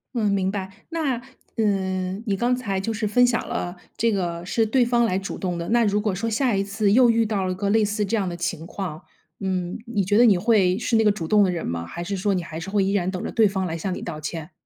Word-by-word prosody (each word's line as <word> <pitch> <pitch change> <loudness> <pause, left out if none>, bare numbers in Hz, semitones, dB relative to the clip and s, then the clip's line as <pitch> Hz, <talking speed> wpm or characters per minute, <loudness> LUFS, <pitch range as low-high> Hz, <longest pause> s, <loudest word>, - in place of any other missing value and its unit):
嗯， 215 -3 +1
明 195 -1 +1
白。 195 -2 -4 0.2
那， 300 -8 -1 0.3
嗯， 190 -3 -1
你 200 - +1
刚 240 +5 +1
才 215 -6 -2
就 225 - -2
是 215 0 -1
分 245 +4 +4
享 245 -2 0
了 175 +1 -3 0.2
这 230 0 +1
个 175 -4 -2
是 225 +4 +1
对 245 +4 +3
方 235 0 +3
来 185 -5 +1
主 195 +1 -5
动 180 -2 -2
的。 170 - -4
那 235 0 +3
如 205 0 +1
果 210 -2 0
说 200 +5 -2
下 240 +2 +1
一 195 - +1
次 200 +1 0
又 245 +3 +6
遇 230 0 +3
到 210 -3 -1
了 185 0 -1
个 200 +1 -1
类 215 +1 +3
似 210 +1 -1
这 225 +3 0
样 195 -3 0
的 175 - -3
情 170 -1 -3
况， 175 -5 -5 0.4
嗯， 185 -2 -2
你 210 -4 0
觉 205 +3 +2
得 240 - +7
你 205 -6 +5
会 190 -2 +3
是 235 0 +1
那 225 - +4
个 210 - +5
主 185 -6 -4
动 210 -1 +5
的 - - +1
人 170 -2 -3
吗？ 85 0 -3
还 170 - -6
是 195 +3 -3
说 200 +2 +1
你 180 -2 -1
还 160 -1 -7
是 175 +4 -6
会 200 0 +2
依 195 - 0
然 190 -3 +1
等 185 -1 -4
着 - - -4
对 220 -2 +4
方 190 -1 -2
来 165 -2 -3
向 185 +3 -3
你 - - -7
道 160 -3 -5
歉？ 155 +1 -6
200 Hz, 300 characters per minute, -23 LUFS, 185-220 Hz, 0.4 s, 得